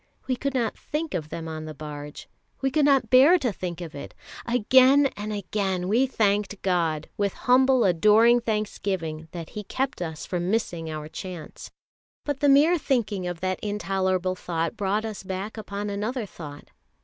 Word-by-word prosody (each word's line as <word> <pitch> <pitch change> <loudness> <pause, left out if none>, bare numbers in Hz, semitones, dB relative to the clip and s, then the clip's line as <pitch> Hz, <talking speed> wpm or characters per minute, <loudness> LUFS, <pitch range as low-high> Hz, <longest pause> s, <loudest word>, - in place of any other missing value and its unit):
We 255 - 0
could 275 +2 -3
not 235 -4 0
think 310 +1 -4
of 155 -3 -3
them 165 0 -6
on 155 -1 -5
the 155 -1 -7
barge. 150 -1 -8 0.3
We 270 0 0
could 295 +2 +3
not 270 -5 +3
bear 275 +8 +7
to 250 - -1
think 180 -2 -5
of 165 -3 -7
it 140 - -9 0.3
again 260 +4 +5
and 210 +1 -5
again 195 -2 -2
we 240 +7 +3
thanked 205 -4 0
God, 165 -5 0
with 200 -2 0
humble 260 0 +5
adoring 215 +7 +5
thanksgiving, 190 -8 -3
that 170 -2 -7
He 210 - -6
kept 260 +1 -3
us 160 -2 -4
from 175 0 -2
missing 175 -7 -1
our 155 -1 -5
chance. 175 0 -8 0.6
But 290 -2 -2
the 290 - +3
mere 305 +5 +5
thinking 210 -10 -1
of 175 -1 -5
that 185 0 -1
intolerable 190 -3 -1
thought 165 -2 -3
brought 205 +2 -1
us 215 -2 -5
back 190 +3 -5
upon 205 -1 -5
another 215 +4 -2
thought. 150 -6 -10
205 Hz, 175 wpm, -25 LUFS, 175-245 Hz, 0.6 s, bear